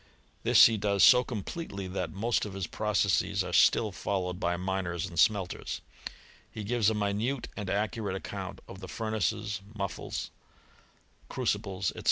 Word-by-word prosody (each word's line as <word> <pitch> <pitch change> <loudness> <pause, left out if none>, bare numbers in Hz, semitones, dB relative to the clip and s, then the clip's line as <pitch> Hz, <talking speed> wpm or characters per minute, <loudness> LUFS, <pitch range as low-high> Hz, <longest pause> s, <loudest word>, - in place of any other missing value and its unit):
This - - +7
he 115 -1 +3
does 100 -1 +2
so 125 -1 +8
completely, 105 - -5
that 90 -3 -3
most 115 +6 0
of 105 - -5
his 95 -2 -2
processes 100 -1 +1
are 90 -1 -6
still 110 +3 +4
followed 90 -1 -2
by 85 0 0
miners 90 -2 -2
and 85 -3 -5
smelters* 95 -1 +1 0.7
He 110 - -7
gives 110 0 +2
a 110 - -1
minute 105 +6 -1
and 100 -3 -5
accurate 105 -1 -1
account 95 - -6
of 95 - -10
the 95 - -8
furnaces, 110 -1 -2
mufflles, 100 -2 -4 1.0
crucibles, 95 -1 -1
&c. - - -8
100 Hz, 150 wpm, -29 LUFS, 95-110 Hz, 1.0 s, so